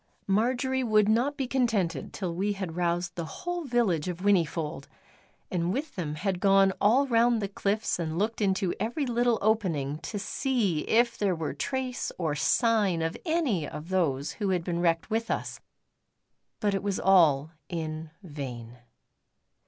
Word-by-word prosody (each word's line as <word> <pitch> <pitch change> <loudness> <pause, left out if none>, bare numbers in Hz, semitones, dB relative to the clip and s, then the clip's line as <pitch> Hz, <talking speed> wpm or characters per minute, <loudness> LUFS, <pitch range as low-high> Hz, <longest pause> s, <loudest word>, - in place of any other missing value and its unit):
Marjory 250 +6 +1
would 215 -3 +3
not 245 +7 +2
be 270 - -1
contented 220 - 0
till 180 -4 -4
we 200 +4 0
had 190 -5 -5
roused 175 0 -1
the 170 - -4 0.2
whole 350 -2 -2
village 225 - +1
of 180 -2 -3
Whinnyfold, 165 -7 0 0.6
and 175 -1 0
with 285 +9 -3
them 155 -6 -3
had 185 +3 -2
gone 195 0 +4
all 240 +7 +4
round 235 -2 +3
the 200 - -2
cliffs 200 +1 -1
and 160 -1 -2
looked 215 +4 -1
into 190 -2 +1
every 240 +8 -1
little 240 -1 +2
opening 165 -10 0
to 210 - -5
see 205 - 0
if 235 +1 +2
there 195 -3 +1
were 160 -2 -3
trace 260 -2 -3
or 160 -4 -1
sign 200 - +2
of 165 +1 -2
any 275 - +1
of 150 +5 -8
those 150 -7 0
who 205 -3 -2
had 180 -3 0
been 170 -1 -2
wrecked 165 +3 +1
with 225 +1 -1
us. - - -3 1.0
But 205 -1 +1
it 195 - 0
was 200 -1 -1
all 160 -6 +4 0.2
in 160 -2 -4
vain. 125 -7 -7
195 Hz, 160 wpm, -28 LUFS, 165-230 Hz, 1.0 s, gone